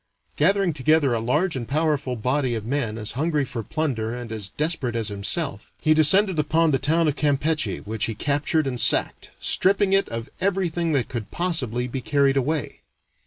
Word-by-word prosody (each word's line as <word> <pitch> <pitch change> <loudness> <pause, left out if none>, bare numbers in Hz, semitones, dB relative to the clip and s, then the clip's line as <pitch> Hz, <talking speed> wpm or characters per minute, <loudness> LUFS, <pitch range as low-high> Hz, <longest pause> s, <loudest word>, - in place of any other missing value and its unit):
Gathering 190 +2 +2
together 145 -1 +2
a 115 - 0
large 150 +10 0
and 120 -3 -5
powerful 150 -3 0
body 125 +2 -1
of 110 -2 -5
men 120 -4 -2
as 105 -1 -3
hungry 150 +1 -1
for 120 -2 -5
plunder 120 -4 -2
and 120 -2 -7
as 105 -3 -3
desperate 150 -6 -2
as 115 -2 -1
himself, 105 - -3
he 155 - +3
descended 175 +4 +5
upon 160 +2 +2
the 135 - +1
town 160 +4 +1
of 145 - 0
Campeche, 150 0 -1
which 110 +1 -2
he 115 - -4
captured 145 +5 0
and 125 -3 -2
sacked, - - +1
stripping 195 +1 +3
it 195 0 +2
of 115 +1 -5
everything 175 -4 0
that 135 -4 +1
could 115 -6 -6
possibly 125 -9 -1
be 130 +1 -5
carried 140 0 +2
away. 140 0 -2
145 Hz, 180 wpm, -23 LUFS, 120-160 Hz, -, descended